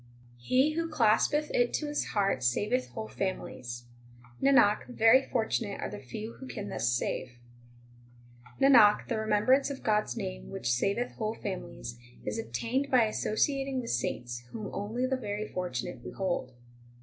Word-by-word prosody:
He 255 - +3
who 330 +1 -1
claspeth 295 +3 +2
it 245 0 +2
to 305 - -1
his 295 0 -1
heart 195 -10 0
saveth 210 - +1
whole 220 -2 -6
families. 120 -10 -4 0.6
Nanak, 270 -7 +4
very 245 +1 +5
fortunate 220 -5 -1
are - - -4
the - - -6
few 210 - -7
who 265 - -8
can 205 -5 -6
thus 120 - 0
save. 120 +1 -2 1.2
21 275 0 +5
Nanak, 210 0 +4
the 230 -3 0
remembrance 220 +6 +3
of 280 - -6
God 210 -1 +2
s 120 - -5
name 60 0 -5
which 120 - -2
saveth 200 - 0
whole 220 0 -2
families, 120 - -6 0.3
Is - - -2
obtained 250 +5 -2
by 255 -3 +5
associating 270 +5 0
with 235 - -3
saints, 120 0 -2
whom 215 -3 -6
only 220 +5 -2
the 265 0 0
very 210 -3 -4
fortunate 175 -11 -4
behold. 175 -6 -3
215 Hz, 155 wpm, -30 LUFS, 180-255 Hz, 1.2 s, very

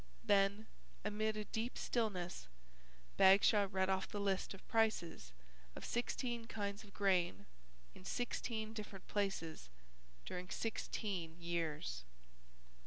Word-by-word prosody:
Then, 200 +1 +4 0.4
amid 215 +1 0
a 210 - -2
deep 225 +4 -2
stillness, 185 - -1 0.7
Bagshaw 200 +1 +7
read 190 -1 +2
off 190 0 +1
the 205 - -4
list 195 -1 0
of 195 - -16
prices 215 - +1 0.4
of - - -6
sixteen 240 0 -1
kinds 200 -2 -3
of 205 - -14
grain 185 -3 +2 0.5
in - - -13
sixteen 220 0 -2
different 210 -3 -7
places 180 - -1 0.6
during 180 +1 -5
sixteen 190 -7 -2
years. 160 - -2
200 Hz, 110 wpm, -39 LUFS, 180-215 Hz, 0.7 s, Bagshaw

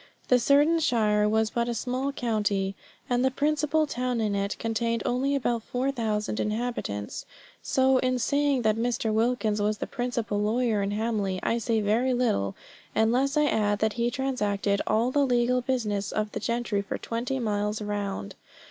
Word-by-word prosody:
The 250 - +5
certain 290 +6 +4
shire 210 -8 +2
was 220 0 +1
but 235 0 -1
a 235 - -2
small 255 +4 -2
county, 210 -6 -1 0.3
and 245 0 +1
the 265 - +4
principal 300 +3 +1
town 250 -3 -2
in 215 -2 0
it 200 0 -1
contained 230 0 -1
only 270 +3 +1
about 240 -4 0
four 250 +4 -1
thousand 215 -4 -2
inhabitants; 215 - -3 0.4
so 265 0 +3
in 255 0 +1
saying 280 +1 +1
that 215 0 +2
Mr. 230 -1 0
Wilkins 220 -2 +1
was 210 +1 +1
the - - -3
principal 235 -4 -2
lawyer 220 0 +1
in 200 - -1
Hamley, 205 -3 -1
I 235 - +1
say 230 -1 0
very 235 +5 +2
little, 100 - 0 0.4
unless 255 +6 +2
I 300 - +4
add 205 -6 +1
that 220 0 0
he 235 0 0
transacted 210 -6 -1
all 225 +4 +2
the 285 +1 +3
legal 250 -1 +2
business 215 -6 -1
of 215 0 -2
the - - -4
gentry 235 -2 -1
for 200 - -4
twenty 240 +3 -3
miles 210 -3 -1
round. 205 - -3
230 Hz, 170 wpm, -27 LUFS, 210-255 Hz, 0.4 s, The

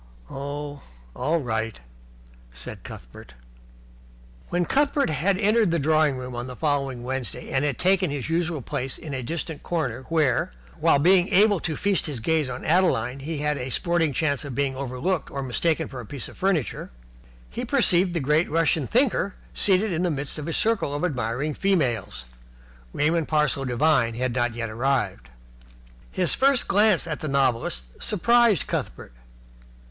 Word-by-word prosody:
"Oh, 145 +1 -5 0.3
all 165 +2 +1
right," 110 - -3 0.7
said - - -8
Cuthbert. - - -11 1.1
When 175 0 0
Cuthbert 280 - +1
had 185 +6 +1
entered 215 0 +3
the 170 - +1
drawing 155 -2 +2
room 125 -1 -6
on 120 +1 -4
the 125 - -7
following 140 -5 -1
Wednesday 130 -5 -4
and 135 +1 +1
had 145 -3 0
taken 185 -1 +2
his 140 -3 -3
usual 165 -3 -1
place 130 +3 -3
in 150 -3 -7
a 130 - -2
distant 160 +3 -4
corner 135 -8 -2
where, 150 - +1 0.3
while 140 - +4
able 190 +2 +5
to 160 -2 -3
feast 200 -1 0
his 140 -5 -4
gaze 155 +3 +1
on 125 - -6
Adeline, 145 -8 +2
he 155 +3 -4
had 150 -1 0
a 125 - -4
sporting 170 +2 +1
chance 140 -1 0
of 140 -4 -6
being 140 -1 0
overlooked 140 +7 -2
or 140 - -4
mistaken 160 +5 0
for 130 - -8
a 120 - -7
piece 140 0 -6
of - - -13
furniture, 185 -8 -1 0.6
he - - -4
perceived 175 0 +2
the - - +1
great 150 +4 +2
Russian 160 -3 +1
thinker 230 -6 +1 0.2
seated 200 +1 +2
in 165 - -1
the 180 - +1
midst 145 0 -3
of 150 - -6
a 165 - -2
circle 215 -10 0
of 145 - -1
admiring 130 0 -2
females. 120 - 0 0.7
Raymond 160 +2 +1
Parsloe 150 -3 +1
Devine 125 -2 +2
had 125 0 -1
not 120 -2 0
yet 115 -2 -3
arrived. 110 - -1 0.8
His 180 -3 +2
first 270 -2 +3
glance 205 -4 +3
at 155 -3 -4
the 155 - -4
novelist 115 - -1
surprised 235 -1 +3
Cuthbert. - - -4
150 Hz, 165 wpm, -25 LUFS, 130-175 Hz, 1.1 s, able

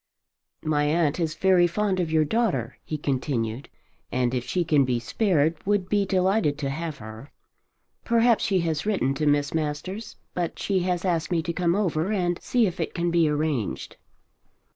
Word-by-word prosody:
"My 150 -1 +1
aunt 155 +1 +1
is 160 -2 -1
very 185 -2 +4
fond 190 +1 0
of 170 -3 -1
your 155 -1 +3
daughter," 180 - -1
he 155 - -4
continued, 130 -4 -2 0.4
"and 125 -1 0
if 125 -2 -1
she 180 -2 0
can 150 -3 +4
be 125 -2 0
spared 160 - +1
would 195 -2 0
be 205 -1 +1
delighted 185 -5 +2
to 140 -2 -2
have 160 0 -4
her. 110 +5 -10 0.7
Perhaps 235 -1 +3
she 190 -3 +2
has 160 -2 -1
written 185 -11 +1
to 150 +2 -1
Miss 145 -1 +2
Masters, 160 +7 -3 0.2
but 175 -2 -2
she 195 -2 0
has 180 0 -1
asked 170 -3 0
me 170 -3 0
to 170 0 -3
come 175 0 +1
over 185 -2 0
and 175 -4 0
see 245 -2 +2
if 185 -2 -3
it - - -3
cannot 170 -1 0
be 165 -2 +3
arranged." 150 -7 -2
165 Hz, 180 wpm, -25 LUFS, 145-185 Hz, 0.7 s, very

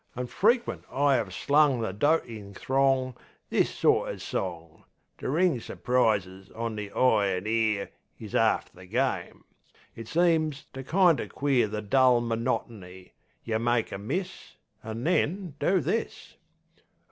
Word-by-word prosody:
An' 125 +1 -3
frequent 230 - +1
I 140 -2 +3
'ave 110 -5 -3
slung 140 +6 +2
the 110 -4 -2
dotin' 110 - -1
throng 135 0 +1 0.4
This - - +2
sort - - +2
o' - - -5
song. 85 -3 -5 0.4
To - - -4
ring 160 -2 +2
su'prises 100 -7 -1
on 115 0 -3
the 105 -1 -6
eye 110 -5 +3
an' 90 0 -2
ear 110 -2 0 0.3
Is - - -10
'arf - - +2
the 90 0 -14
game. - - -2 0.5
It 115 -1 -9
seems 160 -3 +1
to 135 - -7
kind 175 +2 +3
o' - - -5
queer 135 -5 +1
The 105 +1 -5
dull 130 +2 +4
monotony. 115 -5 -4 0.3
yeh 110 -1 -1
make 120 0 0
a - - -5
miss, 180 - -5 0.3
An' 110 +2 -6
then 180 +1 0
do 190 0 +2
this. 175 - -3
120 Hz, 145 wpm, -27 LUFS, 105-145 Hz, 0.5 s, dull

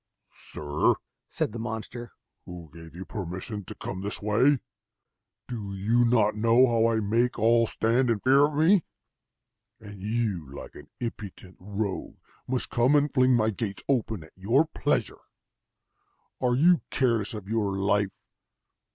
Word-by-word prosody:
"Sir," 75 0 -1 0.3
said - - -2
the 115 - -6
monster, 115 +1 -6 0.4
"who 85 -4 -10
gave 80 0 -12
you 95 +2 -7
permission 95 +2 -5
to - - -8
come 95 - -6
this 100 +1 -3
way? 115 +8 +3 0.9
Do 105 -5 -5
you 115 +5 +2
not 115 -3 +3
know 115 +4 +5
how 115 -2 +2
I 115 -1 +1
make 115 +4 +1
all 115 +1 +4
stand 120 +4 +1
in 115 -3 +1
fear 135 +5 +5
of 150 - -7
me? 165 +4 +4 1.0
and 100 -3 -11
you, 105 - -2
like 70 - -9
an 75 - -13
impudent 100 -5 -7
rogue, 100 +1 -4 0.3
must 130 0 -2
come 125 +5 +3
and 145 -1 +2
fling 130 -2 +4
my 110 -1 +2
gates 100 -1 -5
open 110 - 0
at 80 - -17
your 115 +11 +2
pleasure! 160 - -1 1.2
Are 125 -1 +2
you 170 +6 +4
careless 115 -4 0
of 105 -3 -8
your 105 -3 -1
life? 100 0 +1
110 Hz, 150 wpm, -27 LUFS, 100-125 Hz, 1.2 s, know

